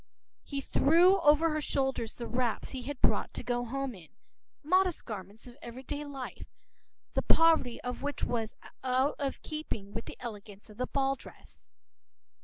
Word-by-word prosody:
p> 280 - -6
He 275 - 0
threw 350 +8 +5
over 300 +2 +5
her 305 0 0
shoulders 265 -5 -1
the 235 - -5
wraps 245 -1 -1
he 260 - -4
had 280 +1 -5
brought - - +2
to - - -4
go 245 0 0
home 270 +2 -2
in, 175 -6 -13 0.5
modest 365 +2 +2
garments 205 0 -7
of 245 +2 -13
every 240 +2 -8
day 290 +3 -4
life, 275 -3 -7 0.7
the - - +2
poverty 325 -7 +4
of 250 0 -4
which 285 +1 -3
was 225 -2 -1 0.3
out 260 +2 +2
of 275 -2 -2
keeping 225 -10 -5
with 225 - -4
the - - -8
elegance 210 -3 -8
of 210 - -15
the 255 - -1
ball 270 -1 +1
dress. - - -15
260 Hz, 175 wpm, -31 LUFS, 235-290 Hz, 0.7 s, threw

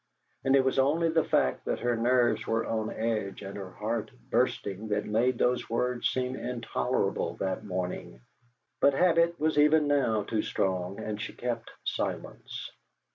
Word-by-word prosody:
And 135 0 +4
it 135 -1 +4
was 130 0 +2
only 160 +5 +3
the 160 -1 +3
fact 65 - +1
that - - -2
her 120 0 +1
nerves 120 -1 +2
were 115 0 +1
on 110 -1 -1
edge 110 -3 -2
and 100 0 -7
her 100 -2 -6
heart 110 +4 -3 0.2
bursting 110 -4 0
that 105 0 0
made 120 +4 +2
those 125 +1 +1
words 120 +1 0
seem 125 0 -1
intolerable 120 -2 -1
that 95 +3 -2
morning; 90 -9 -4 0.6
but 140 - +4
habit 170 +1 +3
was 155 0 +2
even 150 +1 +5
now 130 -7 +2
too 110 0 -1
strong, 95 0 -1
and 105 -1 -4
she - - -5
kept 120 -2 -3
silence. - - -4
115 Hz, 160 wpm, -29 LUFS, 105-130 Hz, 0.6 s, even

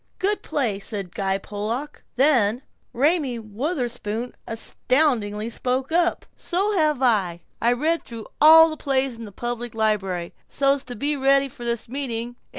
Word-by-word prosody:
Good 405 +2 0
play," 230 -9 -1
said 195 -3 -5
Guy 195 -1 0
Pollock. 215 +9 -5
Then 250 -3 +3 0.3
Raymie 280 0 +1
Wutherspoon 240 - -3
astoundingly 225 -2 0
spoke 255 +4 -2
up: 345 +1 +1
"So 400 +4 0
have 305 -6 +2
I. 190 -8 +2 0.2
I 235 - +3
read 315 +7 0
through 230 -3 -9 0.2
all 320 +1 +9
the 310 - -5
plays 270 -3 0
in 230 0 -8
the 205 - -10
public 240 +2 -5
library, 195 -6 -1 0.2
so's 275 0 +1
to 245 - -7
be 290 +6 -1
ready 275 0 +3
for 240 -2 -10
this 235 -1 -2
meeting. 240 -2 -4
245 Hz, 150 wpm, -23 LUFS, 220-285 Hz, 0.3 s, all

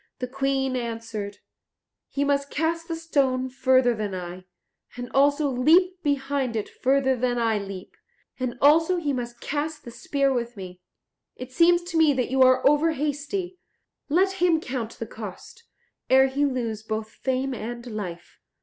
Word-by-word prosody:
The 250 - -3
Queen 270 0 -1
answered, 225 -4 -5 0.7
"He 280 - -1
must 280 0 0
cast 330 +2 -1
the 330 - -3
stone 270 -6 0
further 255 -1 +3
than 210 -3 -3
I, 180 0 -7 0.5
and 245 0 -6
also 285 +2 +3
leap 340 +8 +3
behind 275 -4 -1
it 215 - -2
further 265 0 +1
than 245 0 0
I 225 -2 +1
leap; 195 -2 -8 0.4
and 250 -2 -3
also 325 +5 +5
he 300 -5 -1
must 240 -2 -5
cast 300 +2 -3
the 240 - -8
spear 275 +4 0
with 240 -2 -3
me. 180 -1 -9 0.5
It 255 0 -9
seems 345 +5 +4
to 345 -1 -3
me 315 -2 +5
that 255 -2 -1
you 265 0 +2
are 255 +1 +5
over 300 +3 +3
hasty; 305 +6 -3 0.5
let 380 +4 +1
him 345 -3 +4
count 250 -6 -4
the 230 - -6
cost, 220 - -10 0.4
ere 265 +1 +6
he 285 +2 +1
lose 235 -6 -2
both 220 0 -4
fame 265 +1 -2
and 235 +1 -6
life." 195 -7 -7
260 Hz, 160 wpm, -25 LUFS, 235-290 Hz, 0.7 s, ere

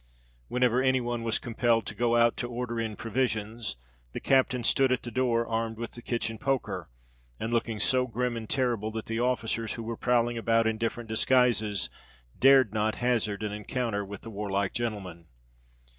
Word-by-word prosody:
Whenever 125 0 +2
any 130 0 +3
one 120 -1 -2
was 115 -1 +1
compelled 115 -2 +1
to 105 - -5
go 120 +2 +1
out 115 0 +4
to 120 - -3
order 120 -1 -3
in 110 -2 -2
provisions, 115 - -2 0.4
the - - -3
captain 130 -2 +2
stood 135 +2 +3
at 130 - +1
the 120 - -6
door, 120 -1 +1
armed 115 -1 -2
with 115 0 -5
the 120 - -11
kitchen 115 -2 -2
poker, 135 +1 -2 0.5
and 115 +1 -3
looking 115 -2 0
so 130 +2 +3
grim 125 +1 -1
and 110 -2 -6
terrible 120 -5 0
that 110 0 -5
the 115 0 -3
officers 115 -2 0
who 115 - -6
were 115 +1 -4
prowling 120 0 +1
about 115 0 +2
in 110 -1 0
different 115 0 -2
disguises, 110 -3 +2 0.5
dared 135 -5 +6
not 110 0 +1
hazard 110 -4 0
an 105 - -2
encounter 105 0 -2
with 100 0 -8
the 115 - -9
warlike 100 -1 -1
gentleman. 95 -8 -4
115 Hz, 180 wpm, -28 LUFS, 110-125 Hz, 0.5 s, dared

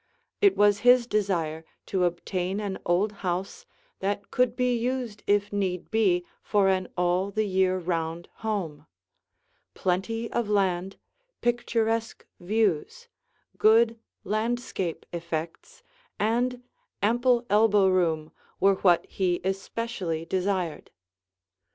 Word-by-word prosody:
It 400 -2 +5
was 205 0 +4
his 245 +1 +5
desire 175 -8 -1 0.2
to 185 -2 +1
obtain 180 +2 -2
an 200 -2 -4
old 185 +5 +2
house 190 - -3 0.3
that 200 +1 -3
could 250 -1 +2
be 250 -1 +1
used 240 -3 -2
if 205 0 +2
need 185 -3 -2
be 190 -6 +2 0.2
for 200 -2 +2
an 185 -1 +1
all 180 +2 +1
the 215 +1 0
year 190 -1 +2
round 170 -1 -3
home; 170 -9 -4 0.9
plenty 225 +6 -1
of 235 -3 -1
land, 190 -2 0 0.4
picturesque 230 -2 -1
views, 215 - -1 0.5
good 225 +1 +5 0.2
landscape 215 -5 -2
effects, 165 -1 -5 0.3
and 245 +4 0 0.4
ample 240 +2 +3
elbow 210 -1 +4
room 165 -4 +1 0.3
were 195 0 +4
what 175 -3 +4
he 180 -2 -1
especially 190 -3 -3
desired. 185 -3 -2
200 Hz, 110 wpm, -27 LUFS, 180-225 Hz, 0.9 s, It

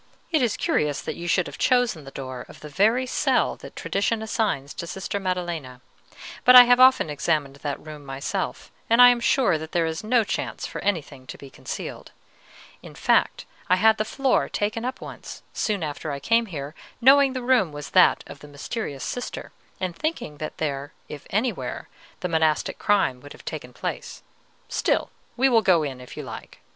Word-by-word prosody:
"It 315 -4 +3
is 235 -4 +1
curious 150 -2 0
that - - -5
you 175 - -6
should 180 0 +2
have - - -9
chosen 245 - +2
the - - -8
door 130 -2 -7
of - - -14
the 150 - -9
very 220 - +2
cell 255 - +1
that - - -12
tradition 215 +3 -1
assigns 210 - -1
to 170 - -6
Sister 190 +3 -4
Maddelena; 175 -9 -3 0.6
but 250 - +7
I 250 - +13
have 245 0 +4
often 260 -7 +6
examined 145 -2 -1
that 140 -1 -4
room 150 -1 -10
myself, 135 0 -4 0.2
and 230 +1 +4
I 245 0 +10
am 245 -1 +2
sure 235 - +2
that 160 0 -9
there 170 -1 +2
is 160 +3 -3
no 230 +1 +3
chance - - -4
for - - -6
anything 155 -9 -3
to - - -8
be 140 -1 -12
concealed. - - -7 0.7
In - - -12
fact, - - +1 0.2
I 180 - +6
had 220 +3 +4
the - - +2
floor 265 +4 0
taken 215 +2 -2
up 255 +1 -4
once, - - -9
soon 205 -5 -1
after 150 0 -4
I 140 - -4
came 230 +9 +2
here, 145 -5 -6 0.3
knowing 270 +2 +6
the 255 -1 -4
room 240 -10 +3
was 145 0 -8
that - - +5
of - - -11
the 150 - -12
mysterious 145 - -5
Sister, 245 - -5 0.3
and 185 -2 -3
thinking 280 - -3
that 155 - -6
there, 145 -2 -3 0.2
if 150 -2 -9
anywhere, 225 +4 -2 0.3
the 180 - -1
monastic 160 -2 +1
crime 195 -12 +1
would 145 - -11
have - - -16
taken - - -6
place; - - -6 0.4
still, - - 0 0.3
we 265 +2 +4
will 235 -4 +4
go 180 -6 +4
in, 135 -3 -5
if 125 - -12
you - - -5
like." - - -9
180 Hz, 195 wpm, -24 LUFS, 145-235 Hz, 0.7 s, I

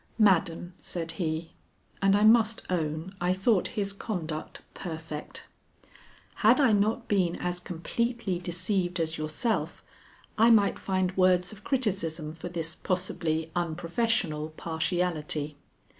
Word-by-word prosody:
"Madam," 180 -4 +3
said 165 -2 -3
he, 165 -1 -3 0.5
and 195 0 +5
I 205 - +3
must 220 0 +5
own 160 +1 -2
I 180 +1 +2
thought 190 +1 +2
his 200 -1 0
conduct 165 -7 -5
perfect, 160 -3 -7 0.9
"had 230 +5 +5
I 265 -5 +5
not 215 +3 +1
been 185 -4 +2
as 180 0 -2
completely 190 +3 -2
deceived 180 +1 -1
as 160 -1 -1
yourself 155 +9 -1 0.6
I 225 +2 +7
might 215 -3 +4
find 185 -1 0
words 180 -1 +3
of 210 -1 -12
criticism 180 - -1
for 165 +2 -7
this 165 -2 -3
possibly 165 -3 -1
unprofessional 170 -1 0
partiality. 160 -3 -1
180 Hz, 120 wpm, -28 LUFS, 160-205 Hz, 0.9 s, I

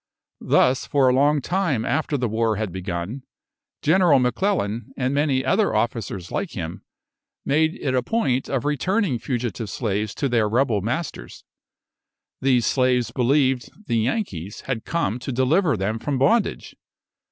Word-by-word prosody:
Thus, 130 +1 +3
for 140 -2 +3
a 125 - +4
long 145 +2 +3
time 170 - 0
after 150 0 0
the 125 -2 0
war 110 0 0
had 105 -2 -3
begun, 95 +6 -4 0.6
General 170 -2 +5
M'Clellan, 125 - 0
and 130 0 0
many 140 -2 +1
other 210 - +2
officers 105 -5 -2
like 200 -3 -3
him, 85 -5 -5 0.6
made 160 +3 +2
it 130 - -2
a 130 - +2
point 130 - 0
of 135 -2 -1
returning 150 - 0
fugitive 120 -4 -3
slaves 105 -1 -2
to 140 - -1
their 115 -4 +1
rebel 115 -2 +1
masters. 120 - -4 1.0
These 125 -4 +3
slaves 125 -2 +2
believed 130 -1 +1 0.2
"the 115 -3 +1
Yankees" 110 - -3
had 125 -4 -4
come 125 -9 -1
to 125 - -5
deliver 135 - +2
them 105 +4 -2
from 140 +3 -2
bondage. 175 - +1
125 Hz, 145 wpm, -23 LUFS, 110-145 Hz, 1.0 s, General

